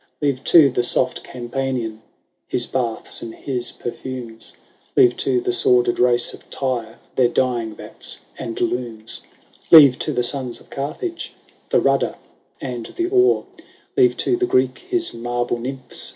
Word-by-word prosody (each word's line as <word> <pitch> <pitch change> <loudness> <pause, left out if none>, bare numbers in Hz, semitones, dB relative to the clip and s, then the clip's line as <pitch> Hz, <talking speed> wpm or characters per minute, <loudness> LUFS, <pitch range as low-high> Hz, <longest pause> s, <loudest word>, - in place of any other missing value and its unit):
Leave 140 -3 0
to 160 -4 +7
the 120 - +1
soft 125 +1 0
Campanian 120 -3 -3 0.5
His 120 - 0
baths 120 -4 -3
and 115 -1 -7
his 125 -3 -3
perfumes; 120 -2 -7 0.5
Leave 125 - +6
to 130 -2 +1
the 120 - -1
sordid 120 0 +3
race 120 -1 +3
of - - -15
Tyre 120 -5 -3 0.2
Their 125 -2 +4
dyeing 120 -3 0
vats - - -7 0.2
and 115 - -5
looms: 120 -9 -2 0.5
Leave 140 -6 +9
to - - -1
the 125 - 0
sons 125 -1 -1
of - - -20
Carthage 155 - -4 0.4
The - - +4
rudder - - +1 0.4
and 125 -4 -5
the 350 0 0
oar: 380 0 +4 0.5
Leave 380 -2 +4
to 365 - +3
the 370 0 0
Greek 130 - +2
his 360 -2 -2
marble 120 0 -2
Nymphs 130 +2 -5
125 Hz, 150 wpm, -21 LUFS, 120-140 Hz, 0.5 s, Leave